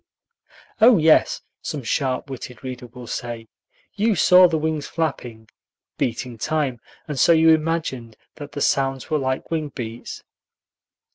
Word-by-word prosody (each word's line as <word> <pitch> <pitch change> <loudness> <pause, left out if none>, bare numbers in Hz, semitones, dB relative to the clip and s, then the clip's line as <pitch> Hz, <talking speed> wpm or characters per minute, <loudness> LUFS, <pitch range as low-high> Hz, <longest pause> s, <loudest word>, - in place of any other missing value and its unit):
"Oh 230 0 +7
yes," 160 -1 +3 0.2
some 145 -4 -5
sharp 130 +3 -1
witted 130 -2 -9
reader 125 -1 -7
will 125 +1 -11
say, 115 -1 -6 0.4
"you 215 +1 +1
saw 180 +1 +7
the 165 -2 -1
wings 155 -1 -2
flapping, 125 -9 -4 0.5
beating 120 -1 -3
time, 145 -3 -1 0.3
and 145 -3 -4
so 170 - +6
you 160 0 +5
imagined 155 -8 -1 0.2
that 145 -1 -9
the 145 - -5
sounds 135 +1 0
were 155 - +2
like 130 +2 -3
wing 155 -2 -1
beats." 115 -3 -7
140 Hz, 140 wpm, -22 LUFS, 125-160 Hz, 0.5 s, Oh